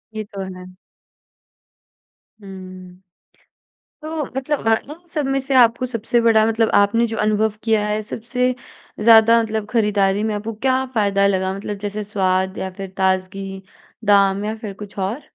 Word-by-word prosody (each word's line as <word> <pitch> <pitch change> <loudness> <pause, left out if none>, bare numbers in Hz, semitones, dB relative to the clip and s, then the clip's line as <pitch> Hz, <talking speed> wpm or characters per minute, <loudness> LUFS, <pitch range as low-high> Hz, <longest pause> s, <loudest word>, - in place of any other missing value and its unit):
ये 215 - -3
तो 195 - -5 0.2
है। 180 0 -11 1.7
हुँ। 185 -1 -11 1.0
तो 310 -1 -3
मतलब 270 -2 -2 0.2
इन - - -6 0.2
सब 300 -4 -2
में 270 0 +1
से 265 0 -3
आपको 245 0 +4
सबसे 235 0 0
बड़ा 225 -2 +4
मतलब 225 0 +1
आपने 215 +4 +3
जो 225 0 -5
अनुभव 215 0 +1
किया 220 -2 +2
है 210 0 -1
सबसे 250 +4 -2 0.5
ज़्यादा 230 +1 +6
मतलब 220 -1 -3
ख़रीदारी 205 -3 +1
में - - -2
आपको 215 +2 -4
क्या 260 0 +2
फ़ायदा 200 -2 +2
लगा 190 -1 0
मतलब 205 +1 -5
जैसे 210 +1 -4
स्वाद 190 -2 0
या 190 - -3
फ़िर 195 0 -8
ताज़गी, 190 0 -1 0.4
दाम 200 0 +3
या 215 +1 -2
फ़िर 215 -2 -7
कुछ 205 0 -11
और? 200 +9 -2
210 Hz, 150 wpm, -20 LUFS, 195-230 Hz, 1.7 s, ज़्यादा